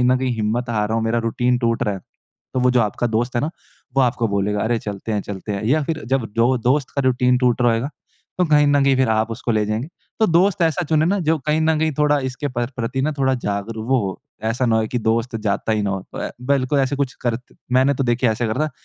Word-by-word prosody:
कहीं 125 - +3
न 130 +1 +4
कहीं 130 -1 0
हिम्मत 115 +3 -1
हार 105 -2 0
रहा 110 - 0
हूँ 115 - 0
मेरा 115 +1 +1
रूटीन 125 +2 +1
टूट 115 -2 0
रहा 105 - 0
है 95 - -7 0.5
तो 130 - +1
वो 125 0 +4
जो 125 -1 +3
आपका 110 +2 0
दोस्त 120 +2 -1
है - - +2
ना 155 - -1 0.5
वो - - +5
आपको 120 -1 +1
बोलेगा 100 +1 0
अरे! 115 +2 +1
चलते 105 +1 -5
हैं, 105 - 0
चलते 100 +1 -6
हैं। 100 +2 -3
या 150 +6 +2
फ़िर 160 +1 -3
जब 130 -3 0
जो 120 +3 +3
दोस्त 135 +1 +2
का - - +2
रूटीन 125 0 +3
टूट 125 -1 +2
रहा 120 - +4
होएगा 115 +6 -1 0.5
तो 180 - +4
कहीं 150 -2 +4
न 145 -1 +3
कहीं 135 - +4
फ़िर 130 -3 +2
आप 110 +1 +1
उसको 115 +1 -3
ले 105 -1 +2
जाएँगे। 110 +6 -2 0.3
तो 220 - +5
दोस्त 175 +2 +3
ऐसा 165 +2 +2
चुने 155 -1 +3
ना 200 +2 +1
जो 160 - +3
कहीं 155 +1 +2
न 160 -1 +2
कहीं 160 -1 +1
थोड़ा 150 -1 +3
इसके 140 +3 -4
प्र 120 0 +1
प्रति 125 +2 -2
ना 155 +2 0
थोड़ा 130 -1 +2
जागरूक 110 0 -4
वो 130 -1 +4
हो। 95 - -7 0.2
ऐसा 120 +3 0
ना 110 -1 +3
होए 110 0 +1
कि 125 - -1
दोस्त 115 +1 0
जाता 110 0 -1
ही 105 -1 0
ना 100 - 0
हो। 95 - -2
तो - - -7
अ, - - -3 0.2
बिल्कुल 140 0 +2
ऐसे 135 +1 +1
कुछ, 140 -2 -1
करत 120 0 -1 0.3
मैंने 130 +2 +4
तो 135 0 -1
देखिए 120 0 +2
ऐसे 115 +2 -1
करा 145 +8 0
था - - -6
125 Hz, 270 wpm, -21 LUFS, 110-140 Hz, 0.5 s, वो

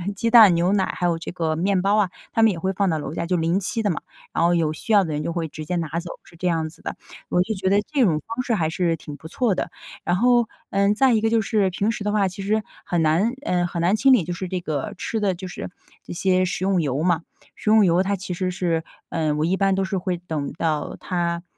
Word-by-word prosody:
鸡 230 +3 0
蛋 225 -5 +8
牛 175 +2 +2
奶， 195 -2 +2
还 175 - -2
有 170 -1 +1
这 165 - -6
个 160 -3 -1
面 185 +2 +1
包 200 +2 +2
啊， 205 -4 +2 0.2
他 225 - +1
们 225 - +6
也 175 - -5
会 190 +3 0
放 195 0 +1
到 160 - 0
楼 150 - -5
下， 170 - -3
就 180 +2 0
临 165 +3 +1
期 225 +4 -2
的 205 - +1
嘛。 165 - -2 0.3
然 - - +1
后 175 - +3
有 160 -2 +1
需 190 - -6
要 200 - +6
的 160 -4 -3
人 150 +1 -2
就 170 - -2
会 165 -2 -2
直 155 0 -8
接 180 - -2
拿 165 -2 -2
走， 170 0 -7
是 - - -18
这 180 - -2
样 165 -2 0
子 155 - -18
的， - - -5 0.3
我 180 - +2
就 215 +4 -1
觉 190 0 -1
得 200 +1 +4
这 285 -4 +3
种 165 -8 +2
方 230 +3 -3
式 240 - -1
还 160 -4 0
是 170 0 0
挺 150 -2 -9
不 160 - -10
错 210 +3 0
的。 - - -3 0.3
然 175 - +1
后， 240 +1 +4 0.2
嗯， 200 +1 +3
再 260 +2 +4
一 220 - +2
个 225 - +2
就 225 0 +3
是 210 -2 +1
平 200 +4 0
时 215 - -5
的 210 - 0
话 205 -2 +2
其 190 +1 -7
实 215 +2 +1 0.2
很 175 -2 0
难， 165 +9 +2
嗯， 175 -1 +1
很 170 -1 -4
难 180 +4 +3
清 270 +5 +4
理， 235 -8 +4
就 175 - -3
是 185 +2 -5
这 185 - -2
个 155 -5 -3
吃 225 - -3
的 200 -2 +2
就 185 +2 -7
是 180 - -6 0.3
这 - - -8
些 185 +1 +2
食 185 0 -3
用 190 -3 +2
油 140 -1 -1
嘛。 175 -2 +2 0.3
食 - - -3
用 215 -1 +6
油 175 +1 +3
它 200 +1 0
其 185 -1 -5
实 185 +1 -2
是， 170 -3 -1 0.3
呃， 155 -2 0
我 150 +1 0
一 180 +3 +1
般 195 -1 +2
都 195 0 0
是 190 +1 -2
会 180 -1 -2
等 160 -5 -4
到 160 -3 -2
它 170 -1 -2
180 Hz, 300 characters per minute, -23 LUFS, 165-200 Hz, 0.3 s, 蛋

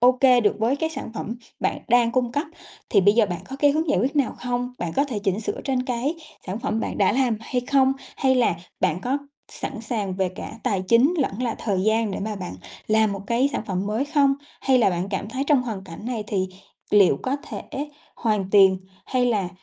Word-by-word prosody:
OK 250 +1 +4 0.2
được 205 - +3
với 230 +5 +2
cái 320 +2 -1
sản 275 -6 -6
phẩm 225 +1 -4 0.3
bạn - - 0
đang 235 -1 +4
cung 245 -2 +1
cấp, 290 +4 -1 0.4
thì - - +5
bây 205 +2 +5
giờ 225 -2 +4
bạn 175 -3 -4
có 270 - -6
cái 290 +1 +4
hướng 315 +3 0
giải - - +3
quyết 270 +7 0
nào 280 -3 +2
không? 245 0 -2
Bạn 170 -2 -3
có 280 - +4
thể 250 -8 -3
chỉnh 200 0 -1
sửa 220 - -3
trên 260 -2 0
cái 255 +4 -1 0.3
sản 190 +3 -3
phẩm 225 -3 -1
bạn - - -3
đã 200 -1 +4
làm 250 -3 +2
hay 250 +2 -2
không, 265 +1 +3 0.2
hay 265 -1 +3
là 240 -9 +2 0.2
bạn 160 +4 +1
có 260 +7 0 0.3
sẵn 265 -5 -5
sàng 210 -4 -2
về 190 -1 +1
cả 185 - -8
tài 195 -3 0
chính 245 - +5
lẫn 250 -4 -1
là 240 -2 0
thời 195 -4 -1
gian 220 +1 +2
để - - -4
mà 210 +1 -3
bạn 185 -2 -6 0.3
làm 215 -1 +3
một 195 - -5
cái 240 +5 +2
sản - - -2
phẩm 190 0 -2
mới 220 +6 0
không? 285 -2 +3 0.3
Hay 265 -1 +3
là 225 - +4
bạn 180 +2 -2
cảm 195 +1 -3
thấy 260 +4 -2
trong 285 -4 +4
hoàn 215 -6 -5
cảnh 190 +5 -9
này 230 -4 -3
thì 190 -3 -1 0.4
liệu 205 -3 +5
có 260 +2 0
thể 280 - -8 0.5
hoàn 210 -5 0
tiền, 195 -2 +6 0.3
hay 255 -1 +1
là 205 -7 +1
230 Hz, 230 wpm, -24 LUFS, 200-260 Hz, 0.5 s, tiền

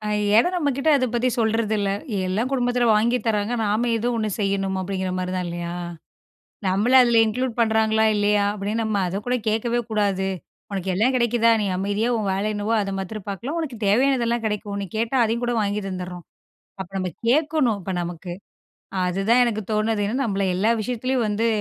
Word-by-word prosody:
ஏனா, 210 +5 +3
நம்ம 310 -5 +1
கிட்ட 285 +3 +1
அத 260 -2 +2
பத்தி 240 +1 +1
சொல்றதில்ல. 220 -2 +1 0.4
எல்லாம் 215 +7 -1
குடும்பத்தில 245 -2 +1
வாங்கித் 235 +2 +1
தராங்க. 210 +1 0
நாம 215 +4 +1
ஏதோ 230 +2 -2
ஒண்ணு 215 -1 -1
செய்யணும் 195 -1 0
அப்டிங்கிற 190 0 -3
மாரி 185 0 -3
தான் 180 -1 -2
இல்லையா? 170 0 -4 0.9
நம்மள 205 +7 +1
அதில 235 -2 +4
இன்க்ளூட் 245 +3 -1
பண்றாங்களா? 220 -1 +3
இல்லையா? 205 0 +2
அப்படீன்னு 210 +3 -2
நம்ம 215 -2 -1
அதக்கூட 205 +8 -2
கேட்கவே 230 +2 +1
கூடாது. 200 -3 0 0.4
உனக்கு 195 -1 -3
எல்லாம் 225 +8 +2
கெடைக்குதா, 235 -1 +3
நீ - - 0
அமைதியா 205 +4 0
உன் 210 -2 -2
வேல 195 +2 -1
என்னவோ 210 +2 -1
அத 195 -1 -3
மாத்ரம் 195 +1 -6
பார்க்கலாம். 240 - -4
உனக்கு 270 -8 -4
தேவையானதெல்லா 240 +2 +2
கெடைக்கும். 210 -1 -3
நீ 195 - -3
கேட்டா 230 +4 0
அதையும் 230 +2 -1
கூட 240 - 0
வாங்கி 205 0 -1
தந்துடுறோம். 180 -2 -6 0.6
அப்ப 190 -1 -6
நம்ம 185 -1 -2 0.2
கேட்கணும். 290 -4 +2
இப்ப 190 - -4
நமக்கு, 175 +1 -6 0.7
அதுதான் 195 +7 +2
எனக்கு 220 -3 -1
தோணுது, 215 0 +1 0.2
நம்மள 200 -4 -1
எல்லா 210 +4 +2
விஷயத்துலயும் 250 +2 -1
வந்து 210 +2 0
215 Hz, 165 wpm, -23 LUFS, 195-235 Hz, 0.9 s, அதில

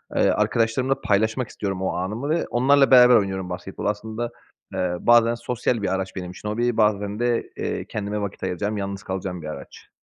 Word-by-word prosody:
eee, - - +4
arkadaşlarımla 115 +5 +1
paylaşmak 110 +4 +1
istiyorum 95 -2 -4
o 95 - -1
anımı 105 +11 -3
ve 165 +2 +1
onlarla 135 +3 +4
beraber 125 -1 +8
oynuyorum 95 -3 0
basketbolu. 90 +3 -4
Aslında, 110 +3 -4 0.4
eee, 90 -1 -1
bazen 120 0 +5
sosyal 120 -1 -1
bir 100 - 0
araç 95 0 -4
benim 90 -1 -5
için, 105 +3 -7
hobi, 120 +2 0
bazen 105 -1 +1
de, 120 -1 0
eee, - - -3
kendime 105 -1 -4
vakit 100 - -5
ayıracağım, 105 +4 -2
yalnız 100 0 -4
kalacağım 95 -2 -4
bir 80 - -7
araç. 70 -3 -10
105 Hz, 180 wpm, -23 LUFS, 95-120 Hz, 0.4 s, beraber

